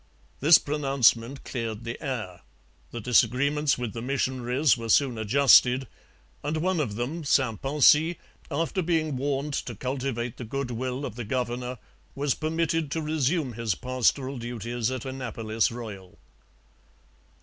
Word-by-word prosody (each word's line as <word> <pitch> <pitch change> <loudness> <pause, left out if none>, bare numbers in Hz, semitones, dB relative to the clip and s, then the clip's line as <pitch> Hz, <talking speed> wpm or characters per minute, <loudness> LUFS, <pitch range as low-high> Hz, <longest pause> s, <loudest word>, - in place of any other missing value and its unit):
This 155 +3 +8
pronouncement 135 -3 +1
cleared 115 -3 -4
the 115 0 -6
air; 110 - -4 0.5
the 120 - -6
disagreements 140 +5 +2
with 120 -4 -4
the 115 - -5
missionaries 130 0 +1
were 115 -1 -6
soon 130 +1 +3
adjusted; 130 +2 +5 0.6
and 150 +2 -1
one 180 +2 0
of 115 -9 -2
them, 140 +9 -3
St 130 -6 +1
Poncy, 150 +4 +4 0.3
after 165 +6 -1
being 160 -4 0
warned 140 +2 -2
to 120 -3 -3
cultivate 125 -1 -3
the - - -6
goodwill 130 +2 -3
of 115 - -7
the 120 - -4
governor, 125 +2 -3 0.4
was 140 -1 +1
permitted 160 0 -1
to 160 +3 -2
resume 150 -2 0
his 110 -4 -1
pastoral 130 +2 0
duties 120 0 -3
at 130 -1 -4
Annapolis 115 -4 -2
Royal. 105 -6 -8
130 Hz, 135 wpm, -26 LUFS, 120-145 Hz, 0.6 s, This